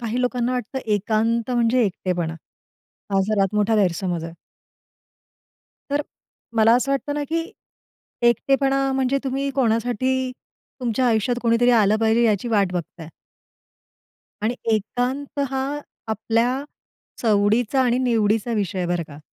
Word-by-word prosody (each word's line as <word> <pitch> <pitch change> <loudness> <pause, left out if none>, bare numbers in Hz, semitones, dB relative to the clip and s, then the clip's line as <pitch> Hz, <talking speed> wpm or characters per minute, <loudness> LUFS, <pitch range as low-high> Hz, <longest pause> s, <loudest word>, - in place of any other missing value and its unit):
काही 235 +1 -2
लोकांना 250 0 0
वाटतं 250 +1 -3
एकांत 220 +3 0
म्हणजे 240 0 +2
एकटेपणा. 180 -4 -2 0.8
हा 195 - +3
सर्वात 200 -1 0
मोठा 210 +1 +2
गैरसमज 180 -3 0
आहे. 165 0 -7 1.6
तर 290 +1 +1 0.5
मला 225 +1 +5
असं 255 +3 +1
वाटतं 290 +1 -2
ना, 295 - -1
की 330 +3 -3 0.8
एकटेपणा 270 +2 +2
म्हणजे 265 +1 +1
तुम्ही 275 +1 -1
कोणासाठी 255 +1 +1 0.5
तुमच्या 250 +1 0
आयुष्यात 230 +2 +1
कोणीतरी 235 +1 +3
आलं 215 -3 +4
पाहिजे 225 +1 +3
याची 215 +1 +1
वाट 200 -5 +2
बघताय. 170 -2 -5 1.3
आणि 230 +3 0 0.2
एकांत 250 +7 -2
हा 265 -1 -1 0.5
आपल्या 230 +5 0 0.6
सवडीचा 220 +4 +2
आणि 245 -1 +2
निवडीचा 225 -2 +1
विषय 200 -4 -1
आहे 180 - -1
बरं 175 -1 0
का. 145 -1 -11
230 Hz, 125 wpm, -22 LUFS, 210-255 Hz, 1.6 s, मला